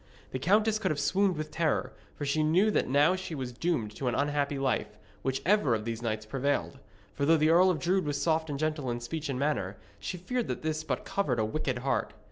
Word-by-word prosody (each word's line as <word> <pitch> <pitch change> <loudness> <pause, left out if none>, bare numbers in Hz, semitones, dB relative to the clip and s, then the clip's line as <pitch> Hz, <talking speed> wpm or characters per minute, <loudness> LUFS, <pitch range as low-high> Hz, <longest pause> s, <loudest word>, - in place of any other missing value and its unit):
The 130 - -3
countess 210 - +3
could 195 -4 0
have 150 - -1
swooned 185 +4 +2
with 155 0 -4
terror, 160 -3 0 0.2
for 145 - -4
she 145 +2 +1
knew 175 +8 +3
that - - +1
now 145 +7 +4
she 185 -3 -5
was 130 -3 -4
doomed 120 -6 -1
to 135 - -2
an 120 - +1
unhappy 145 0 0
life, 130 -5 -1 0.2
whichever 135 - +2
of 105 -1 -4
these 115 0 -3
knights 110 -2 -2
prevailed. 140 +3 -1 0.3
For 140 - -3
though 160 +3 +5
the 155 +1 +3
Earl 180 +3 +6
of 180 - +1
Drood 180 +5 +1
was 145 -1 -1
soft 160 -1 +1
and 145 - -2
gentle 155 -3 -1
in 120 0 -2
speech 155 +5 -4
and 135 - -1
manner, 105 -9 -1 0.2
she 180 - -4
feared 245 +7 -2
that - - -4
this 155 0 -1
but - - -3
covered 145 -12 0
a 110 - +1
wicked 130 +2 -2
heart. 135 - 0
150 Hz, 230 wpm, -29 LUFS, 130-170 Hz, 0.3 s, Earl